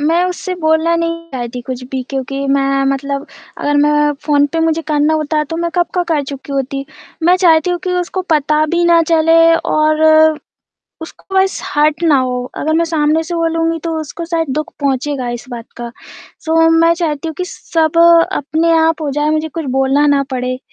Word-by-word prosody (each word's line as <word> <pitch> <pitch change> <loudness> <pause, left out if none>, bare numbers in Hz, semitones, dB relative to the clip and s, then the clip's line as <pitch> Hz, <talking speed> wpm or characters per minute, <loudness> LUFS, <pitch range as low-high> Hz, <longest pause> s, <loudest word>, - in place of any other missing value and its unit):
मैं 325 +4 +2
उससे 365 0 -4
बोलना 320 +1 +2
नहीं 335 0 -3
चाहती 245 -1 -5
कुछ 255 0 -6
भी 260 -1 -3
क्योंकि 275 +1 -3
मैं 275 0 +1
मतलब 275 +1 -4 0.3
अगर 290 0 0
मैं 295 0 +3
फ़ोन 290 -1 +3
पे 330 - 0
मुझे 325 0 0
करना 300 +1 +2
होता 305 0 -1
तो - - -2
मैं 340 0 -2
कब 350 -1 +2
का 360 - +1
कर 295 - +1
चुकी 275 0 -8
होती। 275 0 -3 0.4
मैं 355 +3 +4
चाहती 345 -2 +3
हूँ 350 - -1
कि 365 - -1
उसको 370 +1 -4
पता 300 +1 +1
भी 345 0 +2
ना 340 -1 +5
चले 325 0 +4 0.4
और 310 0 +2 1.0
उसको 385 +3 -11
बस 380 0 +1
हर्ट 300 +2 0
ना 305 -4 +4
हो, 250 -1 -2
अगर 315 +1 -1
मैं 335 +1 +2
सामने 315 -1 +1
से 345 - -5
बोलूँगी 330 0 0
तो 325 -1 -2
उसको 315 +2 -7
शायद 330 -2 -2
दुःख 305 - -4
पहुँचेगा 275 -1 -2
इस - - -13
बात 235 -1 -7
का। 240 0 -6 0.5
सो 325 0 +3
मैं 330 +1 +4
चाहती 325 -2 -3
हूँ 320 - -6
कि 365 - -1
सब 325 -3 -1 0.3
अपने 320 +1 0
आप 320 0 +1
हो 290 - -2
जाए, 295 +2 0
मुझे 310 0 -1
कुछ 325 +1 -6
बोलना 270 +2 +2
ना 275 - +1
पड़े। 255 0 -3
310 Hz, 195 wpm, -15 LUFS, 280-330 Hz, 1.0 s, ना